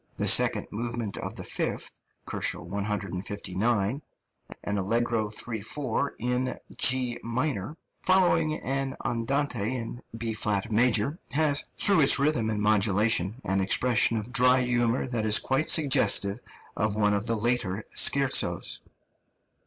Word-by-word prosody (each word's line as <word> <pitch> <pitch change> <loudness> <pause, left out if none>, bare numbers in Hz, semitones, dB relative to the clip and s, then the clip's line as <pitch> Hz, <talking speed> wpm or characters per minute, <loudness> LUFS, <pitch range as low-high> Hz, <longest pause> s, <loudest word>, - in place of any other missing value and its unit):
The - - -1
second - - +4
movement 115 -1 -4
of - - -6
the - - -6
fifth - - -4 0.3
(159 100 0 -3
K.), 105 +6 -2 0.6
an 100 0 -2
allegro 115 +2 -1
3 110 +1 -5
4 140 +4 -2
in 125 +2 -2 0.2
G 125 -2 +3
minor, 125 - -3 0.2
following 180 -4 +2
an 135 0 -2
andante 125 -1 -1
in 120 0 -6 0.2
B 115 -1 -3
flat 105 0 -2
major, 120 - +1
has, 145 -1 +2
through 200 -4 +4
its 140 -2 +6
rhythm 140 -6 0
and 105 -1 -2
modulation, 105 0 +1
an 95 0 +1
expression 115 +3 +1
of 110 +4 -6
dry 125 -1 +4
humour 120 0 0
that 120 -3 -2
is 110 0 +5
quite 135 +4 -1
suggestive 130 -9 +3 0.4
of 105 0 -1
one 105 -1 +2
of 100 +2 -1
the 115 - +1
later 110 -3 -1
scherzos. 135 -2 +2
115 Hz, 130 wpm, -26 LUFS, 105-130 Hz, 0.6 s, its